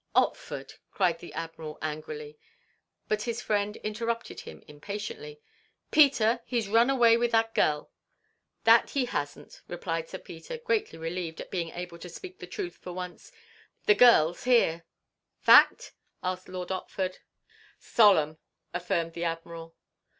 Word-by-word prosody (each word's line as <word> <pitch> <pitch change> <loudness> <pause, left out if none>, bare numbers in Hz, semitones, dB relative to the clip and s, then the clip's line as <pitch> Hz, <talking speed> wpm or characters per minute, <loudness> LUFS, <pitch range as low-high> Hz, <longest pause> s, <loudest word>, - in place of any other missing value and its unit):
"Otford!" - - 0 0.2
cried 175 -4 +1
the 175 - -10
Admiral, 165 -2 -6
angrily; 150 -1 -6 0.7
but 215 0 0
his 235 0 -3
friend 210 -2 -1
interrupted 230 +2 -3
him - - -11
impatiently. 150 -2 -7 0.5
"Peter! 245 -6 +5
He 245 0 -1
's 215 - -3
run 230 +4 +4
away 235 -4 +5
with 240 0 +1
that 225 0 +2
gel!" 150 -1 +1 0.7
"That - - +6
he 275 -4 0
has 145 -11 -3
n't!" - - -15
replied 165 -2 -4
Sir - - -6
Peter, 165 - -9
greatly 460 -2 -1
relieved 165 0 -4
at - - -8
being 170 -3 -2
able 175 0 -7
to 180 - -9
speak 370 - -10
the - - -8
truth 360 -4 -5
for 180 - -8
once. 180 0 -8 0.5
"The 425 - +7
gel's 205 - +5
here." 170 -10 +3 0.5
"Fact?" - - +6 0.3
asked 185 0 -3
Lord 180 -1 -5
Otford. 185 0 -3 0.6
"Solemn," 160 -9 +4 0.3
affirmed 170 -2 -1
the 170 +1 -3
Admiral. 165 0 -5
185 Hz, 145 wpm, -28 LUFS, 165-230 Hz, 0.7 s, The